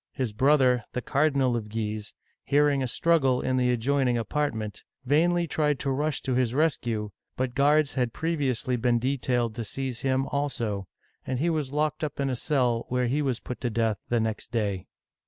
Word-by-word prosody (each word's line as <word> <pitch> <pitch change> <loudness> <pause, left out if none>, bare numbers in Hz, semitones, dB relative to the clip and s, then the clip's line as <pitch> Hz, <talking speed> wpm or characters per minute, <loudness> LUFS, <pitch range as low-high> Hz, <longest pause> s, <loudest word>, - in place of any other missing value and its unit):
His 125 -5 -2
brother, 130 -1 +4
the 125 - -2
Cardinal 140 -3 +2
of 110 -2 -4
Guise, 105 -1 -4 0.3
hearing 145 -1 +3
a 130 - 0
struggle 135 -2 +2
in 130 0 0
the 125 -1 +2
adjoining 125 +1 +1
apartment, 115 -3 -2 0.2
vainly 170 +6 +3
tried 150 -2 0
to 135 +1 -2
rush 145 0 -1
to 130 - -1
his 125 -1 +1
rescue, 120 -9 0 0.3
but 130 -1 -1
guards 145 +2 +3
had 125 -3 0
previously 140 -5 -1
been 120 0 +2
detailed 125 -2 0
to 115 +1 -4
seize 130 +2 -4
him 135 0 +1
also, 115 -9 -2 0.4
and 130 - -2
he 165 +6 +1
was 150 -5 -2
locked 150 +1 -1
up 150 - -3
in 135 -1 0
a - - -1
cell, 125 -3 0
where 125 0 +1
he 135 +5 0
was 130 -4 -1
put 125 - -7
to 125 - 0
death 110 -2 0
the 120 - +2
next 110 0 -3
day. 100 -5 -1
130 Hz, 185 wpm, -27 LUFS, 115-145 Hz, 0.4 s, brother